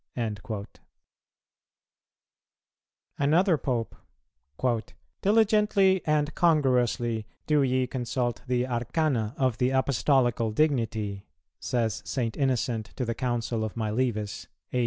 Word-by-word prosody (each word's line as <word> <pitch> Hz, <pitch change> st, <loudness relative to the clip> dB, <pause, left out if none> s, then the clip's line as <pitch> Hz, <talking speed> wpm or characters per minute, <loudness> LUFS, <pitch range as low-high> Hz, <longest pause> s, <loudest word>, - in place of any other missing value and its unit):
"[161:1] 105 Hz, -2 st, -3 dB, 2.5 s
Another 165 Hz, +6 st, +4 dB
Pope: 125 Hz, -6 st, -2 dB, 1.3 s
"Diligently 205 Hz, -2 st, +3 dB
and 150 Hz, 0 st, +1 dB
congruously 125 Hz, -8 st, +2 dB, 0.2 s
do 150 Hz, -1 st, +3 dB
ye 130 Hz, -1 st, +2 dB
consult 125 Hz, -1 st, -2 dB
the 125 Hz, 0 st, +1 dB
arcana 120 Hz, -1 st, -1 dB
of 130 Hz, -4 st, 0 dB
the 125 Hz, -, +3 dB
Apostolical 130 Hz, -3 st, +2 dB
dignity," 110 Hz, -6 st, 0 dB, 0.3 s
says 115 Hz, -3 st, -1 dB
St. 115 Hz, -4 st, -2 dB
Innocent 125 Hz, -5 st, -1 dB
to 125 Hz, -, -2 dB
the 115 Hz, -, -1 dB
Council 120 Hz, -2 st, -2 dB
of 110 Hz, -, -4 dB
Milevis 110 Hz, -1 st, -2 dB, 0.3 s
(A. 125 Hz, -, +1 dB
125 Hz, 95 wpm, -27 LUFS, 115-140 Hz, 2.5 s, Another